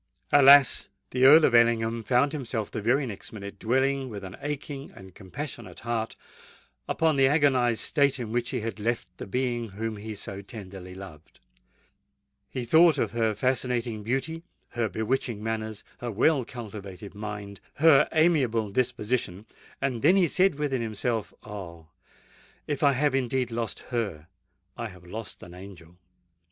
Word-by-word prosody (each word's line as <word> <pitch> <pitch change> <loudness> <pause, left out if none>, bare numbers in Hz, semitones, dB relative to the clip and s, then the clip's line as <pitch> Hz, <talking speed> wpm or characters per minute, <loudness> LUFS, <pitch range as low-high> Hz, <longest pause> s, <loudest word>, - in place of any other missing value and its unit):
Alas! 140 -1 +7 0.2
the 130 +1 +3
Earl 155 +3 +9
of - - +2
Ellingham 115 -1 +3
found 130 +4 +2
himself 125 -7 -4
the - - -4
very 130 +6 +2
next 105 -6 -7
minute 100 -2 -8
dwelling 130 +3 +1
with 100 -3 -7
an 95 0 -8
aching 145 -1 -5
and 95 -1 -13
compassionate 120 +5 -8
heart 115 -1 -2 0.7
upon 160 -3 +2
the 135 0 +5
agonised 130 -6 +3
state 140 -2 +2
in 120 -4 -5
which 120 0 -1
he 125 - -2
had 110 -2 -5
left 115 -3 -1
the - - -6
being 120 0 -1
whom 110 +2 -4
he 110 +1 -6
so 100 -1 -6
tenderly 95 -3 -10
loved:—he 95 - -13
thought 160 +4 +6
of - - 0
her 115 -2 0
fascinating 125 -2 0
beauty—her 130 - -4
bewitching 110 -1 -2
manners—her 110 +1 -5
well 125 +5 +2
cultivated 100 -5 -9
mind—her 105 +8 +1
amiable 130 -10 +2
disposition;—and 120 0 -3
then 170 +6 +5
he 185 -3 +4
said 185 +1 +3
within 140 -4 -1
himself, 110 0 -2
"Oh! 85 -6 -9 0.8
if 145 -2 -3
I 140 -1 +5
have 140 +2 +1
indeed 130 -1 0
lost 115 -1 -3 0.2
her, 100 -11 -2 0.5
I 120 -1 -4
have 90 -4 -14
lost 110 +3 -8
an 90 - -11
angel!" 90 -2 -12
115 Hz, 145 wpm, -27 LUFS, 105-135 Hz, 0.8 s, Earl